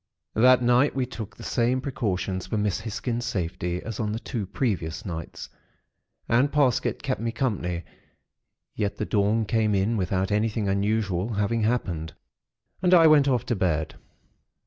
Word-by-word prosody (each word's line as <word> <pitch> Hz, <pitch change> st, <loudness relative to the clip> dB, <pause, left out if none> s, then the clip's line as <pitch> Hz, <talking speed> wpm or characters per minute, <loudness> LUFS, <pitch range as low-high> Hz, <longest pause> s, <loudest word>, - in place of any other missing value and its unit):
"That 125 Hz, +2 st, +5 dB
night, 125 Hz, +4 st, +3 dB
we 130 Hz, -2 st, 0 dB
took 115 Hz, -4 st, -8 dB
the -, -, -10 dB
same 125 Hz, +1 st, +1 dB
precautions 95 Hz, -8 st, -2 dB
for 110 Hz, -, -2 dB
Miss 105 Hz, -2 st, 0 dB
Hisgins' 115 Hz, +2 st, -3 dB
safety, 90 Hz, -4 st, -3 dB
as 115 Hz, -3 st, -6 dB
on 105 Hz, -1 st, -1 dB
the 110 Hz, -, -3 dB
two 110 Hz, -5 st, -4 dB
previous 95 Hz, -8 st, -2 dB
nights; 85 Hz, -4 st, -6 dB, 0.8 s
and 130 Hz, +5 st, +3 dB
Parsket 140 Hz, -5 st, +1 dB
kept 130 Hz, -4 st, -2 dB
me 115 Hz, 0 st, -1 dB
company; 90 Hz, -9 st, -2 dB, 0.9 s
yet 100 Hz, -1 st, -2 dB
the -, -, -2 dB
dawn 105 Hz, +2 st, +1 dB
came 110 Hz, 0 st, +1 dB
in 100 Hz, +4 st, +1 dB
without 95 Hz, +1 st, -1 dB
anything 105 Hz, 0 st, 0 dB
unusual 100 Hz, 0 st, 0 dB
having 105 Hz, +3 st, 0 dB
happened, 90 Hz, -9 st, -1 dB, 0.7 s
and 180 Hz, 0 st, +5 dB
I 165 Hz, -2 st, +7 dB
went 150 Hz, -3 st, +6 dB
off 125 Hz, -4 st, +1 dB
to 120 Hz, -, 0 dB
bed. 80 Hz, -5 st, 0 dB
110 Hz, 155 wpm, -26 LUFS, 95-120 Hz, 0.9 s, I